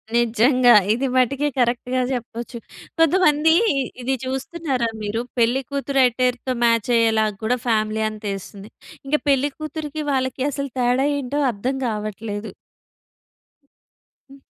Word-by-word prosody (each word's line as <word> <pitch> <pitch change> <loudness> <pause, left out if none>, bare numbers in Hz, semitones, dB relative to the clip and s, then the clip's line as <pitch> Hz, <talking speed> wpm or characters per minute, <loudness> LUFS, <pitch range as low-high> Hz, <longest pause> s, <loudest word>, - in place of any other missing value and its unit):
నిజంగా. 240 +2 +4 0.2
ఇది 265 +3 -1
మటికే 270 +3 +2
కరెక్ట్‌గా 250 +1 0
జెప్పొచ్చు. 240 0 -5 0.4
కొంతమంది 320 -2 +4 0.5
ఇది 265 +2 0
చూస్తున్నారా 265 -2 -2
మీరు, 210 +3 -2 0.2
పెళ్ళికూతురు 270 +3 +1
అట్టర్‌తో 250 +1 0
మాచ్ 230 0 +2
అయ్యేలాగా 220 -2 +2
కూడా 250 +3 +1
ఫ్యామిలీ 215 -1 +1
అంత 215 0 -11
ఏస్తుంది. 195 +1 -10 0.4
ఇంక 300 - +2
పెళ్ళి 280 +1 +3
కూతురికి 310 0 -5
వాళ్ళకి 260 0 -1
అసలు 280 -1 -4
తేడా 250 +3 +2
ఏంటో 280 +2 -3
అర్థం 245 +6 -3
గావట్లేదు. 215 -1 -4 1.8
హ్మ్. 275 - -14
250 Hz, 110 wpm, -21 LUFS, 230-275 Hz, 1.8 s, నిజంగా